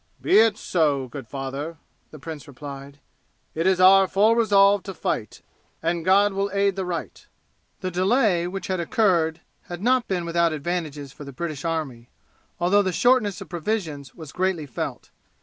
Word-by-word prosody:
"Be - - +4
it 220 -1 +4
so, 145 -9 0
good 130 -1 -9
father," 140 +5 -5 0.3
the 155 - -12
prince 155 +1 -8
replied, 140 0 -10 0.5
"it 165 +3 0
is 190 -1 +3
our 190 +1 +7
full 210 +5 +3
resolve 205 -3 +4
to 195 -1 -8
fight, 110 -8 -3 0.4
and 170 0 -1
God 195 +3 +4
will 195 +1 -1
aid 200 -1 +2
the 190 -1 -3
right." 175 -2 -6 0.5
The 185 -1 -3
delay 185 -1 +2
which 195 0 -5
had 185 -1 -2
occurred 170 -3 +1 0.2
had 175 +2 -7
not 255 +1 +2
been 180 -3 -2
without 170 -1 +1
advantages 150 -3 -4
for 150 - -10
the 140 - -9
British 155 0 -5
army, 150 -8 -4 0.5
although 185 +4 +3
the 190 -2 -1
shortness 215 -3 +2
of - - -9
provisions 160 - -4
was 160 -4 -10
greatly 185 -3 -1
felt. 130 - -6
175 Hz, 165 wpm, -24 LUFS, 150-195 Hz, 0.5 s, our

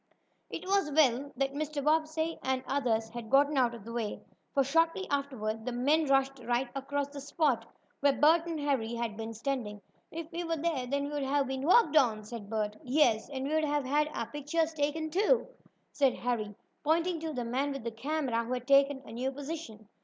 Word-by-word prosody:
It - - -6
was 390 -4 +2
well 280 -2 +3
that 275 0 0
Mr. 295 0 -3
Bobbsey 315 +2 +1
and 260 0 -1
the - - -8
others 230 -5 +1
had 235 -1 -8
gotten 285 +2 +4
out 245 -3 +2
of 225 - -12
the 230 - -7
way, 230 -3 -3 0.3
for 275 - +3
shortly 330 +7 +1
afterward 235 -6 -2
the 250 - -3
men 285 +6 +2
rushed 270 0 +2
right 240 +2 0
across 280 +1 -2
the 285 0 -8
spot 275 -5 0 0.3
where 285 0 +4
Bert 325 +3 +5
and 330 -2 -3
Harry 265 -6 0
had 230 -2 -3
been 225 +1 -5
standing. 225 -3 -3 0.3
"If 330 +1 -7
we 345 +1 -3
were 330 -1 -1
there, 300 -5 -1
then 280 +2 -1
we'd 290 - -1
have 275 +1 +1
been 265 0 -3
walked 350 -5 +5
on," 225 -7 +3
said 210 -1 -8
Bert. 215 -1 -2
"Yes, 250 -5 +2
and 270 -1 -3
we'd 315 +1 +1
have 295 -2 0
had 295 +3 +2
our 230 - -3
pictures 300 +5 -1
taken, 310 +1 -1
too," 425 +7 +3 0.5
said 275 -3 +2
Harry, 220 -4 -2 0.3
pointing 330 +3 +1
to 320 -1 -4
the 245 -3 -3
man 265 +5 -1
with 275 -3 -5
the 235 - -3
camera 250 0 -1
who 240 +2 -3
had 250 -1 -3
taken 275 0 +4
a - - -10
new 250 +4 -2
position. 275 -7 -7
275 Hz, 205 wpm, -31 LUFS, 240-305 Hz, 0.5 s, Bert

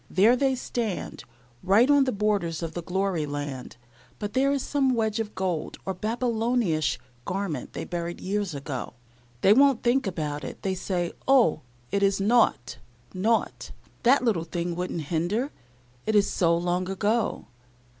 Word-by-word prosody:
There 210 +8 +5
they 265 +1 +2
stand, 235 -5 -4 0.4
right 200 +7 +4
on 285 -1 +5
the 260 - 0
borders 200 -6 0
of 165 -1 -4
the 175 - -4
glory 180 -3 -1
land, 145 -4 -5 0.4
but 205 -1 -5
there 270 +2 +3
is 280 -2 0
some 270 -3 +1
wedge 220 -1 0
of 215 -1 -4
gold, 180 -5 -2
or 190 - -1
Babylonish 225 - 0 0.3
garment 180 -6 -3
that - - -5
they - - -3
buried 175 0 -4
years 200 -3 -2
ago. 135 -4 -5 0.5
They 200 - +7
won't 275 0 +4
think 245 -1 +2
about 150 -5 -3
it. - - -8
They 190 - 0
say, 180 -2 -2 0.2
"Oh, 245 - +4 0.3
it 200 +1 +1
is 195 0 +2
nought, 205 - +2 0.3
nought! 220 +5 0 0.3
That 255 +2 +4
little 210 -9 +1
thing 170 +1 -3
would 180 +1 -3
not 160 -3 -4
hinder, 190 - 0 0.6
it 220 - +1
is 205 -1 +5
so 170 -2 +2
long 180 +1 -1
ago." 210 +4 0
195 Hz, 165 wpm, -26 LUFS, 170-230 Hz, 0.6 s, They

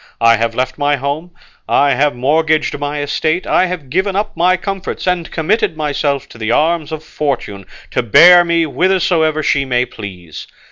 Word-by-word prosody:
I 115 0 +4
have 115 0 -2
left 130 +2 -2
my 145 0 +2
home, 140 +5 -4 0.4
I 140 0 +3
have 140 +1 +1
mortgaged 155 +5 +1
my 145 0 -3
estate, 160 +4 -1
I 185 - +2
have 165 -8 -7
given 190 +4 0
up 210 +1 -2
my 180 +2 +2
comforts, 195 +1 -5
and 180 -2 -1
committed 195 +2 -1
myself 145 -2 -2
to 115 - -14
the 110 -1 -3
arms 160 +3 +1
of 155 0 -6
Fortune, 130 -11 -4 0.2
to - - 0
bear 170 - +7
me 170 -1 +1
whithersoever 165 -2 +1
she 140 -1 +1
may 125 -2 0
please. 90 -9 -10
150 Hz, 175 wpm, -15 LUFS, 135-175 Hz, 0.4 s, bear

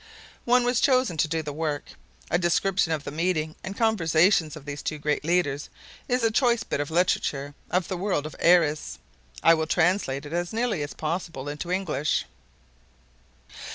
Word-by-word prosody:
One 245 +1 +4
was 245 0 +1
chosen 255 -8 +3
to 155 - +2
do 160 0 -2
the 150 -1 -5
work. 150 -1 -3 0.4
A 175 - +3
description 180 0 +1
of 155 -3 -1
the - - -6
meeting 160 -1 -1
and 190 +1 -6
conversation 175 -6 +3
of 150 -2 -11
these 145 0 -5
two 155 - -3
great 150 0 -1
leaders 150 -4 0 0.4
is 250 -1 0
a 225 - +3
choice 235 -1 +2
bit - - -3
of 145 - -2
literature 145 -4 0 0.2
of 180 -1 0
the 185 - -3
world 180 -6 -1
of 155 - -7
Airess. 155 - +3 0.5
I 165 - +7
will 160 -1 0
translate 160 -5 +1
it 145 - -8
as 175 +2 -2
nearly 225 -7 0
as 145 - -5
possible 160 -3 -4
into 150 +4 -5
English. 175 -5 0
165 Hz, 175 wpm, -26 LUFS, 150-190 Hz, 0.5 s, I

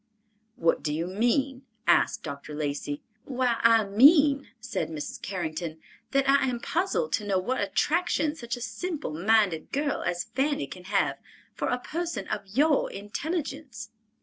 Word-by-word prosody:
"What 165 0 +2
do 150 - -2
you 160 +3 -1
mean?" 245 +7 0 0.2
asked 175 - +3
Dr. 145 0 -7
Lacey. 145 -1 -3 0.2
"Why, 250 -3 0
I 230 -1 +6
mean," 280 - +6
said 245 -5 -3
Mrs. 155 -2 -6
Carrington, 165 -3 -4 0.3
"that 275 -1 +2
I 275 0 +4
am 245 -2 -1
puzzled 385 - -1
to 210 - +1
know 200 -2 +1
what 225 +8 -1
attraction 310 - +1
such 235 -4 -4
a - - -9
simple 320 - -4
minded 195 -1 +2
girl 285 0 0
as 175 0 -1
Fanny 280 - +1
can 180 +6 -11
have 195 0 +1 0.3
for - - -2
a 250 - +1
person 335 +6 -4
of 205 -2 -3
your 285 +8 +2
intelligence." 270 - -5
230 Hz, 150 wpm, -27 LUFS, 180-280 Hz, 0.3 s, I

